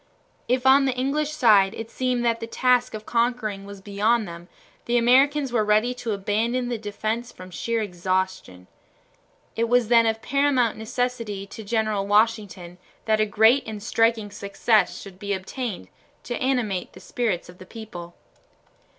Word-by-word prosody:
If 250 +2 0
on 270 +1 +6
the 260 -2 0
English 285 +4 0
side 215 -10 +4
it 225 0 -7
seemed 250 -1 -1
that 230 -1 +1
the 230 - -6
task 250 0 +1
of 215 0 -8
conquering 230 -4 -1
was 200 -1 -10
beyond 210 +3 0
them, 170 0 -10 0.4
the 240 0 +1
Americans 265 +3 +3
were 225 -3 +2
ready 215 +4 +2
to 245 -2 -5
abandon 225 +5 -1
the 240 -2 -3
defense 220 +3 -4
from 185 0 -12
sheer 225 +7 -2
exhaustion. 185 - -3 0.9
It 230 0 0
was 245 -2 +3
then 230 -1 +5
of 225 0 -1
paramount 275 -4 +2
necessity 225 -3 -3
to 220 +2 -10
General 215 -2 -1
Washington 205 -5 0 0.3
that 215 -1 +2
a 215 - +2
great 220 +6 +4
and 210 -2 -6
striking 225 -2 +1
success 200 -1 +1
should 190 -2 -12
be 200 0 -2
obtained 195 - -5 0.4
to 240 - -4
animate 245 -8 -1
the - - -13
spirits 195 -2 -2
of 180 +1 -15
the 185 - -11
people. 175 -7 -9
220 Hz, 160 wpm, -24 LUFS, 200-245 Hz, 0.9 s, on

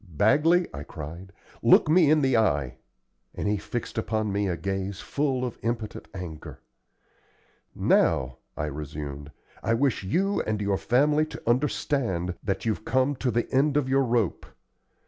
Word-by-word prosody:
"Bagley," 160 - +4
I 70 - -6
cried, 80 +5 -8 0.3
"look - - +6
me 160 -1 +5
in 155 0 +4
the 130 -2 +3
eye." 70 - +1 0.6
And - - -2
he 105 0 +1
fixed 115 +2 -4
upon 110 -1 -1
me 100 0 0
a 90 -2 -1
gaze 95 +2 -3
full 135 -3 -1
of 120 - -6
impotent 115 -2 -3
anger. 85 -5 -8 1.2
"Now," 65 0 +2 0.2
I 75 - -1
resumed, 75 -1 -6 0.3
"I 115 - +1
wish 135 +1 +1
you 195 - +1
and 110 -1 -2
your 100 -1 0
family 150 +5 +2
to - - -10
understand 120 -7 0
that 100 +1 -2
you've 110 -1 -1
come 130 +4 +1
to 130 - -1
the 120 0 0
end 140 +2 +3
of 145 -3 +1
your 135 +1 +3
rope. 115 -6 0
110 Hz, 155 wpm, -26 LUFS, 90-135 Hz, 1.2 s, look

